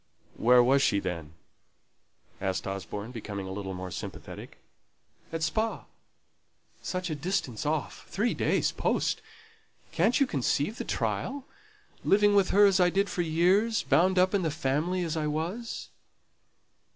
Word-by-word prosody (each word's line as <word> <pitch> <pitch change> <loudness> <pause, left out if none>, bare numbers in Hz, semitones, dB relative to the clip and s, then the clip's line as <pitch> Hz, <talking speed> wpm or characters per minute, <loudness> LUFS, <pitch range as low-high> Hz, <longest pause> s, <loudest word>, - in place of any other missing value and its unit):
"Where 125 +1 +5
was 135 +3 +4
she 100 -6 +3
then?" 85 -5 -5 1.1
asked 95 -1 -1
Osborne, 100 +3 -5
becoming 105 -5 -6
a - - -6
little 95 -1 -5
more 90 0 -6
sympathetic. - - -8 0.7
"At 165 0 -3
Spa. 220 +6 -1 1.0
Such 185 -2 -3
a - - -1
distance 145 - -2
off! 155 -1 -3
Three 225 +4 0
days' - - +1
post! - - 0 0.7
Can't 205 - +2
you 275 - +5
conceive 145 - -1
the - - -3
trial? 280 -1 -2 0.6
Living 205 +1 +4
with 200 -2 +4
her 205 +1 +6
as 195 -1 +4
I 180 -1 +5
did 195 +3 0
for 180 - -1
years; 180 +7 +2
bound 180 +7 +3
up 185 +2 +4
in 200 - +2
the 165 - 0
family 155 +5 -1
as 165 -1 -2
I 155 -1 -1
was." 170 +10 -4
160 Hz, 145 wpm, -28 LUFS, 120-195 Hz, 1.1 s, her